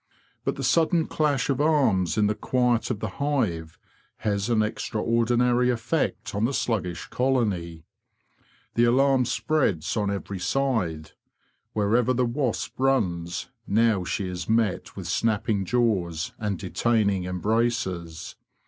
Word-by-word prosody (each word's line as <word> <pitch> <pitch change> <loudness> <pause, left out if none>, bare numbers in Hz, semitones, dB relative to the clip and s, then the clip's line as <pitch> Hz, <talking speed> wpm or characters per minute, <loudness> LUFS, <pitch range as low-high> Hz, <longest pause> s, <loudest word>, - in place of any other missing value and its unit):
But - - -1
the - - -5
sudden 165 0 +3
clash 145 -4 0
of 140 0 0
arms 125 - +2
in 105 - +4
the 105 - +2
quiet 125 +1 +1
of 110 -5 -3
the 110 - -1
hive 105 - -1 0.4
has 100 +1 -1
an 110 -2 +3
extraordinary 120 +3 +1
effect 125 +6 -1
on 100 +1 -1
the 135 +3 -1
sluggish 90 -8 -2
colony. 100 -11 -1 0.9
The 120 - +3
alarm 130 +1 +3
spreads 120 - 0
on 105 -2 0
every 100 -1 -4
side. 90 - -1 0.6
Wherever 115 +4 +2
the 125 +1 +2
wasp 120 0 -2
runs 90 -11 0 0.2
now 110 -2 +3
she 95 +2 -2
is 90 0 -5
met 110 -4 0
with 95 - -7
snapping 105 +2 0
jaws 95 -8 0
and 105 -3 -2
detaining 100 -1 0
embraces. 90 -4 -2
110 Hz, 130 wpm, -25 LUFS, 95-125 Hz, 0.9 s, in